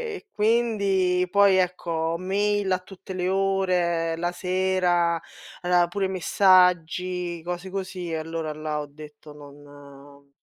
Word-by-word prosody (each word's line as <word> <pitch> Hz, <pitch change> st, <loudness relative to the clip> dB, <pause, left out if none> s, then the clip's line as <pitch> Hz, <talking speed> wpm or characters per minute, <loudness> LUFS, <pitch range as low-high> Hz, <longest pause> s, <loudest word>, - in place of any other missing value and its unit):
e -, -, -11 dB
quindi 200 Hz, -5 st, +1 dB
poi 200 Hz, 0 st, +5 dB
ecco 170 Hz, -3 st, -1 dB
mail 200 Hz, +2 st, 0 dB
a 185 Hz, -, +2 dB
tutte 190 Hz, 0 st, -11 dB
le 180 Hz, -1 st, -2 dB
ore, 185 Hz, -4 st, +1 dB
la 175 Hz, +1 st, -1 dB
sera, 180 Hz, -2 st, +1 dB, 0.4 s
aveva 175 Hz, -1 st, +3 dB
pure 195 Hz, +2 st, -2 dB
messaggi, 180 Hz, -2 st, +2 dB
cose 175 Hz, +2 st, -5 dB
così 185 Hz, -2 st, -5 dB
e -, -, -1 dB
allora 160 Hz, -1 st, -4 dB
là 155 Hz, 0 st, -4 dB
ho 150 Hz, -, -5 dB
detto: 150 Hz, +1 st, -13 dB
"Non" 140 Hz, -1 st, -15 dB
180 Hz, 125 wpm, -25 LUFS, 165-190 Hz, 0.4 s, poi